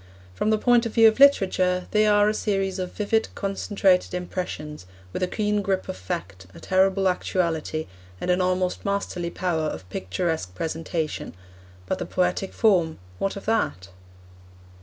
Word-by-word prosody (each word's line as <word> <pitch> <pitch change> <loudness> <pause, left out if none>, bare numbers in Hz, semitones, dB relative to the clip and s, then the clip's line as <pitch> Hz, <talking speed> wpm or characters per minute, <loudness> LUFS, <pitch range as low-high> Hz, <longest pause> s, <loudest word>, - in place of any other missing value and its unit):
From 100 - -1
the 215 - +3
point 240 +1 +3
of 220 - -9
view 225 -1 +8
of 220 +3 +2
literature, 185 -9 +4
they 215 0 +4
are 205 0 +5
a 215 - +2
series 195 -3 -1
of 180 -1 -4
vivid, 220 +1 0
concentrated 195 -2 +1
impressions, 155 - -5 0.3
with - - -3
a 185 - +2
keen 210 +1 0
grip 190 -1 -1
of - - -4
fact, 95 0 -6
a - - -10
terrible 190 +1 +2
actuality, 165 -4 -1 0.3
and 180 - 0
an 180 +1 +2
almost 185 0 0
masterly 200 -3 -2
power 170 -3 -1
of 95 - -6
picturesque 95 - -2
presentation. 160 - -3 0.5
But - - -2
the - - -4
poetic 180 +1 0
form 180 -8 +2 0.2
what 195 - -1
of 200 - -8
that? 155 - -1
185 Hz, 160 wpm, -25 LUFS, 165-205 Hz, 0.5 s, view